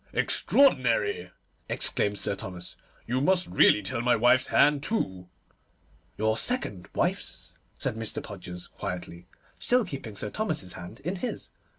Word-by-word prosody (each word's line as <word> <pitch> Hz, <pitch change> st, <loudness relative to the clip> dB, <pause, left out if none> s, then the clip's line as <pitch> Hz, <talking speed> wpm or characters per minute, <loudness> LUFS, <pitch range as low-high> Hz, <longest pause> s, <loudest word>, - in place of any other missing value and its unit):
'Extraordinary!' 115 Hz, -, +3 dB, 0.4 s
exclaimed 100 Hz, 0 st, +1 dB
Sir -, -, 0 dB
Thomas; 90 Hz, -3 st, -6 dB, 0.3 s
'you 130 Hz, +2 st, 0 dB
must 185 Hz, +4 st, +3 dB
really 105 Hz, -, +5 dB
tell 105 Hz, +4 st, -2 dB
my 125 Hz, 0 st, +4 dB
wife's 120 Hz, +3 st, +4 dB
hand, 145 Hz, -1 st, +4 dB
too.' 95 Hz, -, -2 dB, 0.9 s
'Your 110 Hz, +1 st, +1 dB
second 115 Hz, -, -1 dB
wife's,' -, -, -1 dB, 0.2 s
said 110 Hz, -, -2 dB
Mr. 115 Hz, -1 st, -4 dB
Podgers 90 Hz, -3 st, -8 dB
quietly, 90 Hz, -2 st, -6 dB, 0.3 s
still 245 Hz, -2 st, +3 dB
keeping 135 Hz, -, -7 dB
Sir 105 Hz, +2 st, -2 dB
Thomas's 155 Hz, -, -3 dB
hand 90 Hz, +8 st, -9 dB
in 180 Hz, +6 st, -3 dB
his. 245 Hz, -, -4 dB
110 Hz, 130 wpm, -28 LUFS, 95-145 Hz, 0.9 s, really